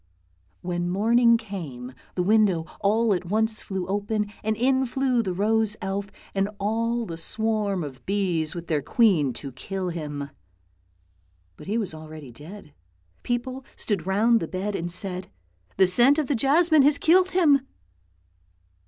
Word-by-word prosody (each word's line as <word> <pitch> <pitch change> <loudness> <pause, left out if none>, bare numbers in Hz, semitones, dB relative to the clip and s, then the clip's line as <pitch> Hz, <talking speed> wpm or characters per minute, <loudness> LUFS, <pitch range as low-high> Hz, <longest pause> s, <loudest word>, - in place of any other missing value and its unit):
When 175 0 -2
morning 230 +5 +4
came, 155 - -8 0.2
the 180 - 0
window 200 -5 +3
all 215 +2 +2
at 180 -1 -3
once 220 +4 0
flew 190 -2 -4
open, 205 +2 -2
and 215 0 -1
in 260 +2 +2
flew 255 -1 +1
the 195 -5 -3
rose 210 +3 +1
elf 195 +1 -4 0.2
and 195 +1 0
all 230 +3 -1
the 165 -5 -7
swarm 210 0 -1
of 135 -3 -9
bees 180 -6 0
with 170 -1 -6
their 155 -3 0
queen 170 - +3
to 135 +3 -6
kill 185 +8 -4
him. 145 -4 -5 1.2
But - - -13
he 210 +3 -1
was 205 -8 -2
already 155 -3 -10
dead; 150 - -12 0.5
people 255 +2 -3
stood 195 -5 -3
round 225 +4 +3
the 165 - -4
bed 195 +4 -3
and 175 -1 -3
said, 180 0 -1 0.2
" 90 0 -38
The 190 - +6
scent 245 - +5
of 310 - +1
the 280 - -1
jasmine 305 +5 +4
has 285 +1 +5
killed 365 +3 +4
him! 305 -7 +4
200 Hz, 155 wpm, -25 LUFS, 175-230 Hz, 1.2 s, The